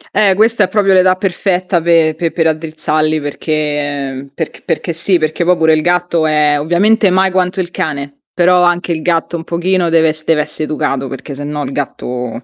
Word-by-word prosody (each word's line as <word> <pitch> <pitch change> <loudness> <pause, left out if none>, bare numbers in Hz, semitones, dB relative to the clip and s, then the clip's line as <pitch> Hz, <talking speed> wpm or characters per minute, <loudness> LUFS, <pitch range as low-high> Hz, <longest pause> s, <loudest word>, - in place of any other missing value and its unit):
Eh, 195 -3 +3
questa 220 0 +3
è - - -5
proprio 200 -2 +2
l'età 185 0 +4
perfetta 185 -1 -1
pe 165 -1 +3
pe 165 -2 -2
per 165 - -1
raddrizzarli 155 -1 -1
perché 145 -2 -3
perché 160 - -5
perché 170 - -3
sì, 175 +3 +1
perché 155 +1 -1
poi 180 +1 +2
pure 160 0 +3
il 155 - +2
gatto 175 -1 +1
è 150 -1 +2
ovviamente 195 +7 +2
mai 190 +1 +2
quanto 185 +1 0
il 175 -1 -3
cane, 140 -3 -4
però 180 0 +3
anche 175 0 +1
il 160 -1 -2
gatto 170 0 -1
un 165 - -7
pochino 175 +1 0
deve 165 -1 +3
es 155 0 -5
deve 155 -1 +2
esse 150 +1 -7
educato, 135 -3 -2
perché 135 +2 -7
sennò 145 +1 -5
il 135 - -5
gatto 125 -3 -5
165 Hz, 195 wpm, -14 LUFS, 150-180 Hz, -, l'età